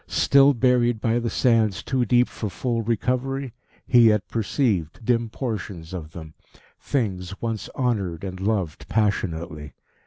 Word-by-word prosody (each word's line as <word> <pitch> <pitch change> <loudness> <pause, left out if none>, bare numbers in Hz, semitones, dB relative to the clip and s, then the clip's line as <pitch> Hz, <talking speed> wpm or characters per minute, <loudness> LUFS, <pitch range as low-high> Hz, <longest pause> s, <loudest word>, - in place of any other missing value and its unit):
Still 140 0 +4
buried 120 -2 +2
by 115 +1 +1
the 120 -1 -2
sands 115 -6 +2
too 130 -2 0
deep 125 +2 +3
for 105 - -5
full 115 +5 -2
recovery, 125 +3 -1 0.3
he 120 -2 +6
yet 105 -3 +2
perceived 110 - -1
dim 115 -1 +1
portions 100 -9 -5
of 80 -3 -7
them 80 -2 -9 0.5
things 100 -7 -3
once 115 -2 -4
honoured 100 - -1
and 95 -1 -5
loved 95 -6 -2
passionately. 85 -8 -2
110 Hz, 135 wpm, -24 LUFS, 95-125 Hz, 0.5 s, he